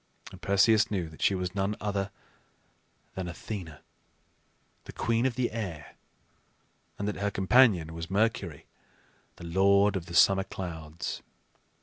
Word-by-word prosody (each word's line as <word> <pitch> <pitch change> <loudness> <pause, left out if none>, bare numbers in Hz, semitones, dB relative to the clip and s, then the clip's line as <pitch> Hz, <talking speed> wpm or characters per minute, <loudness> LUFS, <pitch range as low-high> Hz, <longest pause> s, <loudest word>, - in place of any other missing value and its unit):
And - - -13
Perseus 105 +2 +4
knew 95 -5 -2
that 80 - -14
she 100 - +3
was 90 -1 -3
none 100 +1 -1
other 100 -1 -2 1.0
than 95 -1 -4
Athena, 85 -3 -7 1.0
the - - -9
queen 115 +2 +1
of 125 - -3
the 125 -1 0
air, 95 -10 -6 1.0
and 100 - -3
that 105 - -2
her 100 +1 0
companion 95 -5 +4
was 85 0 -6
Mercury, 100 -6 -1 0.7
the 85 - -11
lord 100 +4 +4
of 90 -3 -4
the 85 - -6
summer 95 +2 +5
clouds. 80 -4 -6
95 Hz, 135 wpm, -29 LUFS, 85-105 Hz, 1.0 s, summer